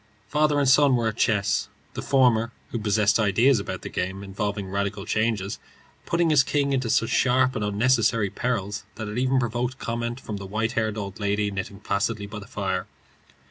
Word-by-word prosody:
Father 150 0 +2
and 140 - +2
son 135 0 +5
were 115 -2 +1
at 110 - -7
chess, 105 -4 +1 0.2
the - - -4
former, 120 -4 +3 0.2
who 120 - -2
possessed 105 +1 +2
ideas 110 +5 +4
about 95 -2 -5
the - - -5
game 95 +2 -3
involving 100 0 -3
radical 100 +1 -3
changes, 110 -2 -1 0.5
putting 170 -1 +2
his 150 -3 +6
king 140 0 0
into 130 -3 0
such 115 - +2
sharp 130 0 +3
and 110 - -2
unnecessary 110 -1 +2
perils 105 -4 -2
that 110 - -5
it 105 +4 -3
even 130 +1 +2
provoked 120 +1 -1
comment 120 0 -3
from 105 -5 -6
the 100 -1 -7
white 110 +3 -1
haired 110 -2 -1
old 100 -1 -6
lady 100 0 0
knitting 100 0 -5
placidly 100 +1 -1
by 105 +1 -7
the 100 - -11
fire. 95 -2 -3
110 Hz, 185 wpm, -25 LUFS, 100-125 Hz, 0.5 s, his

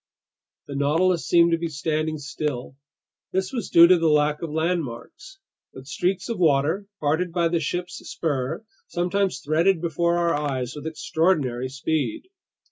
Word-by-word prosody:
The 140 - -8
Nautilus 155 +2 +1
seemed 170 -1 +5
to 165 - +2
be 170 - -2
standing 155 +1 -2
still. 145 -3 -4 0.6
This 190 +6 -1
was 235 -7 -3
due 170 0 +8
to 180 0 +5
the 165 - +2
lack 150 0 +2
of 165 - -4
landmarks. 160 - -3 0.4
But 130 - -10
streaks 180 +6 -1
of 230 -5 -4
water, 160 +5 +2
parted 160 +4 0
by 170 -1 +1
the 170 0 +1
ship's 175 +3 -3
spur, 145 - -2 0.2
sometimes 180 +2 -1
threaded 165 +5 +3
before 170 +1 0
our 170 -1 +2
eyes 135 -4 -2
with 150 +1 -6
extraordinary 155 -5 0
speed. 160 - -2
160 Hz, 150 wpm, -24 LUFS, 145-175 Hz, 0.6 s, due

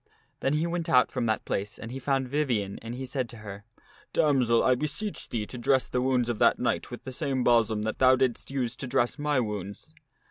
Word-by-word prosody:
Then 135 - 0
he 155 +2 +1
went 170 -1 -2
out 125 -1 +4
from 125 -3 -1
that 110 -1 0
place 100 +1 -3
and 115 - -8
he 135 - -5
found 135 0 0
Vivien 125 -8 -1
and 115 +1 -6
he 130 +1 -5
said 130 -2 -2
to 120 - -9
her, 100 0 -8 0.2
" - - -28
Damsel, 130 -7 +3
I 130 - +5
beseech 150 - -3
thee 110 -3 -2
to 125 - -8
dress 130 +2 +2
the 125 - -1
wounds 125 -2 +1
of 120 -3 -2
that - - +5
knight - - -1
with - - -8
,the 130 - -6
same 130 0 -1
balsam 115 -3 +3
that 110 0 -3
thou 130 0 +6
didst 130 -2 -1
use 125 -3 -2
to 135 - -5
dress 120 +3 0
my 145 -2 +1
wounds." 100 -4 -5
125 Hz, 235 wpm, -28 LUFS, 115-135 Hz, 0.2 s, thou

